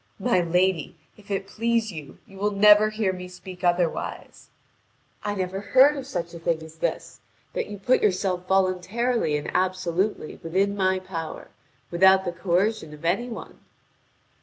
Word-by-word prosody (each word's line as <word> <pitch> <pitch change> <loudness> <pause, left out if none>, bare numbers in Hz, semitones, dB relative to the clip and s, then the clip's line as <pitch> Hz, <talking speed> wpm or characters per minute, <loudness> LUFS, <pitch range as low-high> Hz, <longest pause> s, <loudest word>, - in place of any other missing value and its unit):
"My 210 -1 +2
lady, 175 -1 +1 0.2
if 210 0 -19
it 195 -1 -2
please 230 +2 0
you, 155 -5 -9
you 195 - -15
will 205 +1 +1
never 210 +1 +6
hear 215 -3 -1
me 180 0 -7
speak 180 0 -11
otherwise." 175 -1 -1 0.7
"I 205 - -2
never 190 0 -3
heard 265 +8 +5
of 270 -2 -6
such 175 -8 -4
a 170 - -8
thing 165 -1 -1
as 160 0 -13
this: - - -3 0.3
that - - -2
you 205 - -7
put 245 +6 +2
yourself 185 -2 0
voluntarily 190 0 +1
and 145 - -5
absolutely 185 -1 -1
within 195 +5 0
my 190 -1 +2
power, 175 -4 -6 0.4
without 190 +2 +5
the 175 - -1
coercion 180 -2 -1
of 150 - -12
any 200 +9 0
one." 230 - -9
190 Hz, 160 wpm, -25 LUFS, 175-210 Hz, 0.7 s, never